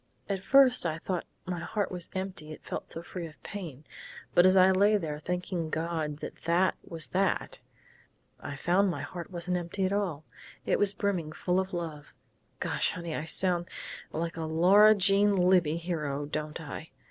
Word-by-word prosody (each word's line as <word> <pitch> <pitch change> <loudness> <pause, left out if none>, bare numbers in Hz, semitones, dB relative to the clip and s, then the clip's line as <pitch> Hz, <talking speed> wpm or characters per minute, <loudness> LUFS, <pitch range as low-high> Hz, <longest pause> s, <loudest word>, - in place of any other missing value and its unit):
At 195 -2 -2
first 265 0 +6
I 160 -2 -1
thought 180 +1 -3 0.2
my 180 -2 -3
heart 200 +4 -2
was 180 -2 -5
empty 185 -5 -4
it 155 - -10
felt - - -5
so 165 - -5
free 175 -1 -6
of 155 - -17
pain. 165 -9 -7 0.5
But 175 +1 +7
as 185 +1 +5
I 185 +1 +7
lay 205 +3 +4
there 155 -5 -4
thanking 180 -1 -3
God 160 -2 -2
that - - -6
that 175 +3 +3
was 160 -5 -3
that, 190 0 0 0.8
I 145 - -6
found 180 +7 +2
my 145 -5 -3
heart 170 +4 -7
wasn't 180 0 -2
empty 175 +3 -2
at 190 - 0
all. 175 -7 -2 0.4
It - - +1
was 205 -1 +4
brimming 190 -6 -2
full 180 +3 0
of 190 0 -2
love 160 -4 -6 0.4
Gosh, - - +1
honey! 170 -2 -5
I 155 - -3
sound 175 0 +1 0.4
like 165 +1 -3
a 165 - -2
Laura 190 +7 +6
Jean 200 +1 +3
Libbey 180 -4 +3
hero, 150 -5 -3
don't 150 +1 -4
I?... 160 0 -7
175 Hz, 180 wpm, -29 LUFS, 160-190 Hz, 0.8 s, But